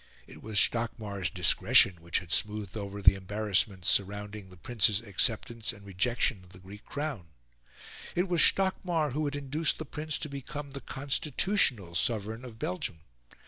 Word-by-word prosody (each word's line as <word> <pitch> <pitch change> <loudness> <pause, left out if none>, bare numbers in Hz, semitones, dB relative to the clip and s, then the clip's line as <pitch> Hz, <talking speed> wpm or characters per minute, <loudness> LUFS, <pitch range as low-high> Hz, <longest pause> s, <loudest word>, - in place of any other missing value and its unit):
It - - -13
was 110 -2 0
Stockmar's 110 -6 0
discretion 90 0 +4
which 85 +1 -1
had 90 -2 -6
smoothed 105 -1 0
over 100 -1 -6
the - - +8
embarrassments 95 -1 -1
surrounding 105 0 0
the 90 - -15
Prince's 110 0 +1
acceptance 115 +2 -1
and 100 -4 -14
rejection 100 +1 0
of 90 - -19
the - - -13
Greek 100 +3 -12
crown. 140 - -4 0.9
It 180 +2 +1
was 175 -3 +2
Stockmar 175 -5 +2
who 150 +4 -1
had 145 0 -2
induced 145 +3 -1
the 160 - -6
Prince 150 +2 -3
to 155 - -4
become 140 +1 -7
the 140 0 -7
constitutional 135 - 0
Sovereign 110 +4 -1
of 120 -3 -10
Belgium. 90 -5 -3
110 Hz, 155 wpm, -29 LUFS, 95-140 Hz, 0.9 s, the